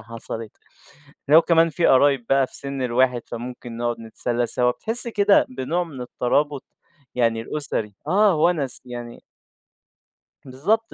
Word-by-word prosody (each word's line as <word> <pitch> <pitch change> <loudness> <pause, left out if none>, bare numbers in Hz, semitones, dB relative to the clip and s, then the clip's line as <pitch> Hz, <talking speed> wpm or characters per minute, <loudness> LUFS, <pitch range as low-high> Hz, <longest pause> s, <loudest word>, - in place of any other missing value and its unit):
حصلت. 115 0 -8 0.8
لو 160 +3 +7
كمان 165 -1 +4
في 170 +1 +1
قرايب 135 -2 +4
بقى 135 -1 +3
في - - -15
سِن 140 -1 -5
الواحد 125 0 +1
فممكن 120 0 -7
نقعد 120 0 -2
نتسلى 120 +2 -2
سوا، 125 +1 +2
بتحِس 230 - 0
كده 205 -3 +3
بنوع 145 +8 -2
من 145 -6 -10
الترابط 140 +3 -1 0.5
يعني 115 -2 +1
الأسري 115 -6 -4
آه 195 +2 +4
وَنَس. 150 -5 +1
يعني 120 -1 -8 1.3
بالضبط، 195 +13 -1
130 Hz, 130 wpm, -22 LUFS, 120-160 Hz, 1.3 s, لو